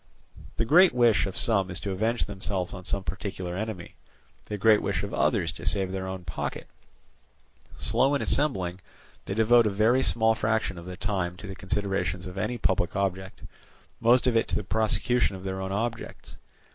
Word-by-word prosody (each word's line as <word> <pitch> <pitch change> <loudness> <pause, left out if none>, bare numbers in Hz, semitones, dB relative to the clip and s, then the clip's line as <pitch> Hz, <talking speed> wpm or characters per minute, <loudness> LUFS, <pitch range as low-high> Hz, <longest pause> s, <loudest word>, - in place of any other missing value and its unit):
The 115 - +1
great 175 +5 +6
wish 120 -4 +4
of 95 - -5
some 100 -6 +2
is 90 -2 -3
to 100 - -3
avenge 110 +5 0
themselves 95 -2 -3
on 90 - -8
some 100 - -2
particular 95 -2 -5
enemy, 100 -3 -6 0.5
the 105 - -4
great 105 +1 +4
wish - - -2
of - - -5
others - - +1
to - - -11
save 95 -2 0
their 95 0 -4
own 95 -1 -6
pocket. 80 - -5 1.1
Slow 135 +2 +2
in 140 - -1
assembling, 95 -12 +1 0.5
they 95 - -4
devote 115 +1 +5
a - - +2
very 110 +6 +3
small 115 -3 +3
fraction 110 -4 -1
of 85 - -11
the 90 0 -7
time 95 -3 -2
to 100 - -9
the 95 - -6
consideration 95 -1 -2
of 90 - -8
any 105 +5 -2
public 95 -5 0
object, 95 +1 -3 0.6
most 120 +2 +4
of 125 -2 +2
it 115 - +2
to - - -2
the - - -1
prosecution 110 +2 +1
of 95 - -9
their 95 0 -4
own 95 0 -4
objects. 115 +3 -4
100 Hz, 185 wpm, -27 LUFS, 95-115 Hz, 1.1 s, great